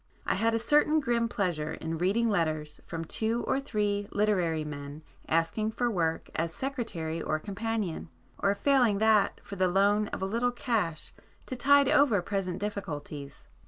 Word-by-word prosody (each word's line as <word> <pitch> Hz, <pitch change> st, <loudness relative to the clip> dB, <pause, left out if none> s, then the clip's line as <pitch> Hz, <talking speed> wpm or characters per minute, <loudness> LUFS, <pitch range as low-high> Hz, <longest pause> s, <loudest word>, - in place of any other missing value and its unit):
I -, -, +1 dB
had 225 Hz, 0 st, +1 dB
a 225 Hz, +1 st, -1 dB
certain 300 Hz, +2 st, +4 dB
grim 235 Hz, -4 st, 0 dB
pleasure 175 Hz, -9 st, -1 dB
in 165 Hz, 0 st, -4 dB
reading 205 Hz, +7 st, +2 dB
letters 155 Hz, -6 st, -1 dB
from 165 Hz, -1 st, -4 dB
two 225 Hz, +7 st, 0 dB
or -, -, 0 dB
three 205 Hz, -6 st, -1 dB
literary 180 Hz, -7 st, +1 dB
men, 145 Hz, +1 st, -7 dB, 0.3 s
asking 165 Hz, +7 st, +1 dB
for 240 Hz, 0 st, 0 dB
work 165 Hz, -5 st, -1 dB
'as 165 Hz, 0 st, -1 dB
secretary 200 Hz, -, -3 dB
or 155 Hz, -, 0 dB
companion,' 200 Hz, -1 st, -3 dB, 0.3 s
or 200 Hz, 0 st, +2 dB
failing 245 Hz, -2 st, +3 dB
that, 215 Hz, -1 st, +3 dB
for 200 Hz, -, -8 dB
the 185 Hz, 0 st, +3 dB
loan 200 Hz, +3 st, +3 dB
of -, -, -5 dB
a -, -, +1 dB
little 235 Hz, +5 st, 0 dB
cash 220 Hz, -, -2 dB, 0.3 s
to 255 Hz, -, -5 dB
'tide 280 Hz, +2 st, +5 dB
over 280 Hz, -8 st, +4 dB
present 185 Hz, -2 st, -2 dB
difficulties. 155 Hz, -8 st, -6 dB
200 Hz, 160 wpm, -29 LUFS, 165-230 Hz, 0.3 s, tide